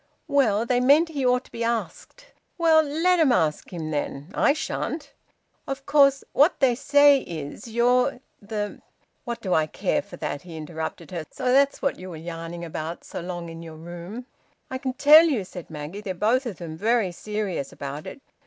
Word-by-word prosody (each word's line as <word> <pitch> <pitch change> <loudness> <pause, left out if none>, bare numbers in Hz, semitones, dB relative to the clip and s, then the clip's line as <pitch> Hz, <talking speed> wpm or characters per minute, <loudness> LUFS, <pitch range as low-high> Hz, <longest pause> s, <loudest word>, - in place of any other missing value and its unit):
"Well 240 -7 +2
they 245 +1 +2
meant 290 +7 +5
he 285 -4 -3
ought 250 0 +3
to - - -21
be 230 - -4
asked." 235 - -3 0.3
"Well, 325 -2 +5
let 325 +4 +2
'em 305 -5 +5
ask 160 -9 0
him, 160 -3 -5
then. 145 +2 -4
I - - +4
shan't." 315 +1 -4 0.5
"Of 275 0 -5
course 275 -2 +4
what 295 +6 +4
they 260 -3 +4
say 285 +2 +5
is 165 - -7
you're 245 +3 +2 0.2
the 205 0 -4 0.2
" - - -43
"What 235 -2 -4
do 185 -3 -1
I 155 -1 +3
care - - -1
for - - -12
that?" 145 - -4
he 170 -1 -10
interrupted 160 0 -6
her. 170 -3 -4
"So 255 -1 -1
that's 280 +1 +3
what 275 - 0
you 185 +1 -8
were 170 - -7
yarning 165 +1 -7
so 160 0 -6
long 180 +1 -5
about 170 - -8
in 165 0 -9
your 165 -1 -9
room!" 175 +8 -8 0.5
"I 260 - -3
can 260 -1 -3
tell 305 +5 +8
you," 270 -11 +1
said 180 -2 -10
Maggie, 160 +6 -7
"they're 190 -3 -4
both 240 +8 +1
of 215 - -5
them 165 -3 -7
very 220 0 +1
serious 200 -6 -4
about 140 +2 -7
it. - - -9
220 Hz, 195 wpm, -25 LUFS, 170-275 Hz, 0.5 s, tell